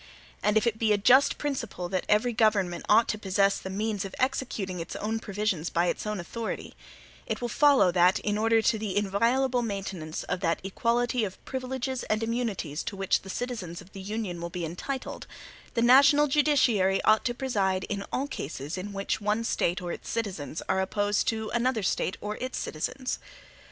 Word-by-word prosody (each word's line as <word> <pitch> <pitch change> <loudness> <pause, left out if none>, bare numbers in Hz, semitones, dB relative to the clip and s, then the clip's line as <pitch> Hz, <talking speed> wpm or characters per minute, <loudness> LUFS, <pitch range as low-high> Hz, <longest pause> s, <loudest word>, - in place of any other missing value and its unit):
And 210 +1 +3
if 220 - +2
it 225 -2 0
be 220 -2 +2
a - - +3
just 255 +7 +5
principle 235 -11 -3
that 185 -1 -2
every 220 +3 +3
government 205 -6 +1
ought 225 +2 +6
to 215 - -1
possess 195 0 +2
the 190 - -7
means 210 +1 -2
of 195 - -7
executing 235 -8 -1
its 165 - -6
own 220 +1 -2
provisions 200 -6 -2
by 170 +1 +1
its 180 - -2
own 210 -2 -2
authority, 225 +6 -5 0.5
it - - -2
will 245 - -3
follow, 275 -6 +5
that 180 +2 +4
in 205 -1 0
order 225 +1 +3
to 220 - +2
the 205 -2 -2
inviolable 235 +6 +2
maintenance 195 -7 -4
of - - -2
that 170 -3 0
equality 235 +5 0
of 190 -3 -4
privileges 260 0 -3
and 215 +1 0
immunities 225 -10 -2
to - - -4
which 195 0 +1
the 190 - -11
citizens 200 -7 -4
of 185 +1 -14
the 195 - -8
Union 200 -3 -4
will 170 - -4
be 175 -1 -4
entitled, 250 - -5 0.5
the 230 - +2
national 280 +4 +7
judiciary 265 -10 +3
ought 215 0 +4
to 240 - -1
preside 195 -8 0
in 200 0 -3
all 270 - 0
cases 150 - -5
in 200 +2 -6
which 195 +2 -2
one 210 +2 0
State 180 -5 0
or 175 - -3
its - - -7
citizens 190 -9 -3
are 190 - +2
opposed 205 +2 0
to 220 -1 -1
another 240 -2 +1
State 185 - 0
or 210 +1 -4
its 255 +1 -4
citizens. 255 - -3
210 Hz, 190 wpm, -28 LUFS, 190-240 Hz, 0.5 s, national